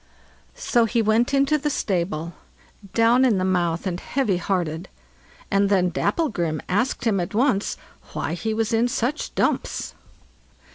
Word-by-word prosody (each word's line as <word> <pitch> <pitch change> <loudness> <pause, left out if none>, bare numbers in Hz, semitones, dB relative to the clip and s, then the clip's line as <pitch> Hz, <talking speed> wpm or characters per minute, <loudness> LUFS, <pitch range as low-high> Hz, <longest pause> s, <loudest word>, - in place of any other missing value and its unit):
So 245 - +2
he 235 +1 0
went 225 +3 +2
into 280 +2 +2
the 295 +1 -1
stable, 170 - -2 0.6
down 235 +3 +4
in 235 -6 +3
the 185 - 0
mouth 175 -2 0
and 180 -2 -2
heavy 250 -8 0
hearted, 175 -2 -2 0.6
and 200 0 +3
then 180 -3 +2
Dapplegrim 175 - -1
asked 205 +7 0
him 210 -4 +2
at 175 +3 -4
once 235 -4 +1 0.4
why - - -2
he 220 +6 -2
was 225 +1 -1
in 230 +2 +3
such 250 +5 -2
dumps. - - -1
210 Hz, 145 wpm, -23 LUFS, 180-245 Hz, 0.6 s, down